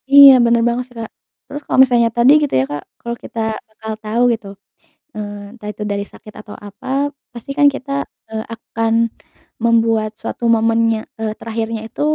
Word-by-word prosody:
Iya 280 0 +10
bener 235 0 +3
banget 240 +1 0
sih 245 - -21
Kak. 225 - -6 0.3
Terus 290 - -7
kalau - - +1
misalnya 240 -3 +3
tadi 240 +3 +6
gitu 295 - -1
ya 130 - +2
Kak 145 0 -4 0.2
kalau 235 0 -4
kita 230 - -7 0.3
bakal 220 0 -7
tahu 220 +3 -1
gitu, 220 -3 -6 0.7
eee, 205 -1 -7
entah 220 -4 -10
itu 210 - -6
dari 200 0 -1
sakit 215 - -13
atau 210 -1 -11
apa 205 +6 -13 0.5
pasti 240 +3 -8
kan 290 - +6
kita, 275 0 -7 0.4
eee, 220 0 -3
akan 225 0 -2 0.7
membuat 225 -2 +2
suatu 235 - -4
momennya, 225 0 +2 0.2
eee, 220 -1 -2
terakhirnya 225 0 -3
itu - - -7
225 Hz, 175 wpm, -18 LUFS, 215-235 Hz, 0.7 s, Iya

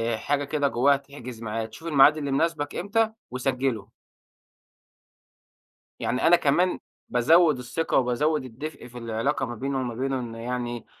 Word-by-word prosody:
حاجة 145 +5 -1
كده 145 0 0
جواها 140 +2 +3
تحجز 130 -5 -10
ميعاد، 110 0 -4
شوف 160 +8 -9
الميعاد 150 0 +6
اللي 140 -2 -3
مُناسبِك 145 0 0
إمتى، 220 +3 +1 0.2
وسجِّله. 125 -4 -2 2.1
يعني 125 +6 0
أنا 175 - +8
كمان 175 +5 +2 0.3
بازود 155 +4 +4
الثِّقة 145 +6 -1
وبازود 135 +4 +1
الدفء 130 +3 -8
في 120 0 -12
العلاقة 115 +4 -1
ما 120 -1 -6
بيني 135 +4 -3
وما 125 -3 -2
بينه، 135 +1 -1
إن 115 -2 -6
يعني: 120 0 -4
135 Hz, 140 wpm, -26 LUFS, 120-150 Hz, 2.1 s, أنا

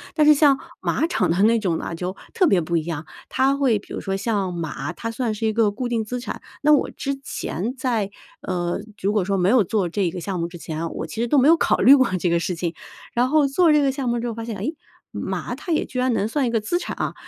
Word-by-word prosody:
但 305 - +4
是 300 - +8
像 285 -2 +5 0.2
马 - - +1
场 340 - 0
的 175 - 0
那 230 +2 +5
种 180 -6 0
呢， 170 - -5
就 180 +3 -4 0.2
特 375 - +3
别 195 - +4
不 170 +1 -2
一 165 - +1
样， 165 -2 -4 0.2
它 270 +1 +2
会 265 -6 +2
比 - - -12
如 - - -4
说 195 -1 -2
像 200 -2 -1
马， 160 -3 -4
它 230 - -5
算 230 -1 -2
是 215 +1 -3
一 220 - 0
个 220 -2 +3
固 245 +4 -3
定 230 -2 0
资 245 +3 -4
产， 245 - -6 0.2
那 300 +1 +6
我 290 - +3
之 275 0 -3
前 220 - -3
在， 235 -6 0 0.3
呃， 175 0 -2 0.2
如 200 +2 +1
果 210 -3 +2
说 195 +1 0
没 180 0 +2
有 245 -2 +5
做 195 0 0
这 185 0 0
个 180 - -5
项 185 +1 -3
目 170 - -1
之 175 0 -10
前 160 -1 -5
啊， 165 - -2
我 - - -5
其 160 +8 -4
实 240 - 0
都 290 - +3
没 265 +1 +5
有 330 - +8
考 - - +2
虑 275 - +8
过 260 -3 +4
这 175 - +1
个 170 - +2
事 175 +1 -2
情， 170 0 -3 0.4
然 245 +2 +2
后 300 -1 +4
做 325 +4 +4
这 300 -1 +5
个 275 -1 +2
项 265 -2 -2
目 235 0 0
之 240 - -3
后 235 - -3
发 225 +1 -6
现， 225 -3 -5
哎， 195 - -4 0.5
马 - - -4
它 350 - -6
也 315 - +1
居 255 - -8
然 255 -1 +2
能 210 -2 0
算 275 +4 0
一 235 - 0
个 230 - +2
资 280 +12 0
产 360 - -5
啊。 - - -2
225 Hz, 300 characters per minute, -22 LUFS, 180-260 Hz, 0.5 s, 是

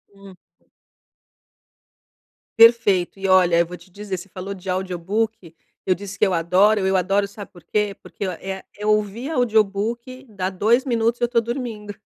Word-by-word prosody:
Hum. 195 -1 -14 2.2
Perfeito! 225 -6 +5
E 195 - -2
olha, 180 -2 +5
eu 170 - +3
vou 180 +1 -9
te - - -19
dizer, 200 0 -6
você 185 +3 -11
falou 190 +2 -6
de 190 -1 -9
audiobook. 185 +1 -2 0.3
Eu 185 - +2
disse 200 +1 -8
que - - +5
eu 190 - 0
adoro, 185 +6 +3
eu 190 0 +2
adoro, 195 +2 +1
sabe 200 0 -11
por 175 - -17
quê? 210 -2 -1
Porque 200 - -6
ó 185 - -3
é 190 +3 -6
é 210 - -6
ouvir 215 +6 0
audiobook, 235 +1 0
dá 190 -3 -3
2 225 +7 +2
minutos 235 -2 0
e - - 0
eu - - +4
tô 235 -1 +2
dormindo. 230 -4 -5
200 Hz, 175 wpm, -22 LUFS, 185-225 Hz, 2.2 s, Perfeito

